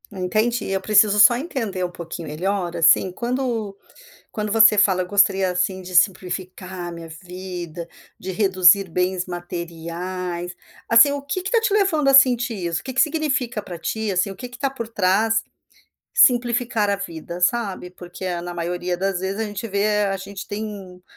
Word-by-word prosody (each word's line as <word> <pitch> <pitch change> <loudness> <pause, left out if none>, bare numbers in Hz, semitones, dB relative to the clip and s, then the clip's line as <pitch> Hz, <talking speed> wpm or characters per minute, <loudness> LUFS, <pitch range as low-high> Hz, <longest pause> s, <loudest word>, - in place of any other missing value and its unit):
Entendi, 215 +6 -1
eu 195 0 -1
preciso 210 +1 +4
só 235 +3 +7
entender 230 - -3
um - - -4
pouquinho 170 -1 -8
melhor, 175 +3 -2
assim, 170 +2 +4
quando 235 -4 -3 0.6
quando 210 -1 -3
você 220 -1 +6
fala: 190 -2 +3
"Eu - - -6
gostaria, 195 -1 +3
assim, 185 +1 -1
de 185 0 -9
simplificar 185 -1 -1
a - - -7
minha 170 -1 -9
vida, 175 0 -8 0.3
de 190 - -6
reduzir 190 -1 +4
bens 180 +1 -1
materiais". 175 0 -6 0.3
Assim, 230 +5 +7
o 285 - -3
que 285 +6 -4
que 385 - -4
tá 465 -1 +3
te 445 -3 0
levando 355 -9 +2
a 275 - +4
sentir 245 -3 +5
isso, 170 -4 -3
o - - -19
que 260 - -6
que 265 - +4
significa 270 -7 -1
para 175 -3 -8
ti, 220 +4 -3
assim, 185 +1 0
o 195 - -9
que 250 - -7
que 245 0 -13
tá 275 +1 -1
por 230 -4 -6
trás, 220 +2 +1 0.7
simplificar 240 - +3
a 200 - +2
vida, 170 -2 -7
sabe? 190 -2 -1
Porque, 180 0 -6
na 175 0 -7
maioria 175 +1 -3
das 190 0 -1
vezes, 190 +3 -3
a - - 0
gente 205 +1 -5
vê 210 0 +1
a 195 -1 -1
gente 195 0 -8
tem, 205 -4 -7
195 Hz, 180 wpm, -22 LUFS, 180-225 Hz, 0.7 s, só